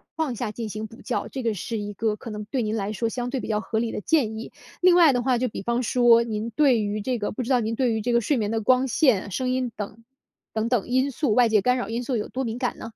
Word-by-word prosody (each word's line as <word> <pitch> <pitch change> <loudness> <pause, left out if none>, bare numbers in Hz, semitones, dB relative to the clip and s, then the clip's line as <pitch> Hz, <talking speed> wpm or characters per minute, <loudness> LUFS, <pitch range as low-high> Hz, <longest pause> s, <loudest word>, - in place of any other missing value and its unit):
况 310 -6 -1
下 210 - -3
进 225 0 -5
行 215 +1 -5
补 230 - -15
觉， - - -2
这 260 -2 -5
个 225 -2 +1
是 225 +4 -4
一 205 0 -5
个 215 0 -1
可 230 - -9
能 210 0 -5
对 250 +3 -2
您 215 0 -1
来 205 -1 -2
说 230 +2 -1
相 245 +1 -3
对 265 0 -2
比 - - -6
较 210 -1 0
合 220 -1 -2
理 230 -1 -1
的 - - -4
建 230 -8 +1
议。 225 - -7 0.3
另 365 -1 +6
外 330 -5 +6
的 245 - +1
话 255 -2 +2
就 255 - 0
比 210 - -6
方 235 +2 0
说 235 -1 +5
您 220 0 -3
对 265 -7 +4
于 210 +1 -2
这 250 +2 -1
个 205 - -2
不 235 - -4
知 240 - -6
道 255 -2 +4
您 220 +1 -2
对 245 -1 +1
于 220 - -1
这 245 - -1
个 235 - +5
睡 290 - +1
眠 210 -1 -1
的 225 - 0
光 255 +4 +3
线、 220 -8 +2
声 255 +6 -1
音 255 -2 -1
等 215 +2 -7 0.5
等 220 +1 0
等 245 -4 +1
因 260 +2 +2
素 260 -4 0
外 245 -1 +5
界 215 -2 +4
干 250 +3 +2
扰 245 - -3
因 235 +2 -2
素 245 -1 -1
有 210 - -3
多 265 +1 -3
敏 230 -1 -3
感 250 -1 -2
呢？ 225 - -7
235 Hz, 325 characters per minute, -24 LUFS, 215-255 Hz, 0.5 s, 另